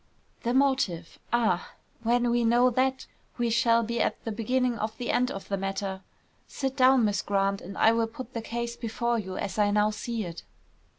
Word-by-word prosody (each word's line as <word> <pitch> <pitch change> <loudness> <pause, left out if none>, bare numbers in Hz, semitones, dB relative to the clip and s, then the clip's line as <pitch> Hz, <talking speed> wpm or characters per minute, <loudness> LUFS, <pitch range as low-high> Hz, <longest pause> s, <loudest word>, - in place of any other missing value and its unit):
"The 240 +1 -1
motive, 260 -12 +1
ah! 220 -7 +1 0.3
When 240 +1 +2
we 240 0 +2
know 240 +2 +4
that, 260 +2 0 0.3
we 240 -2 0
shall 230 0 +3
be 235 +1 -1
at - - 0
the 225 - -2
beginning 240 +2 0
of 220 +1 -3
the 245 - -2
end 250 0 +2
of 195 - -7
the 195 - -1
matter. 195 0 -3 0.5
Sit 270 -1 -3
down, 260 -3 +5
Miss 205 -1 0
Grant, 195 0 0
and 195 +2 -9
I 225 - +5
will 230 0 +1
put 255 +2 -9
the 230 - -3
case 235 +1 -4
before 235 0 -1
you 190 -3 -5
as 205 - -3
I 205 -1 +4
now 210 +1 +3
see 225 0 -4
it." 170 -1 -7
230 Hz, 195 wpm, -27 LUFS, 205-240 Hz, 0.5 s, down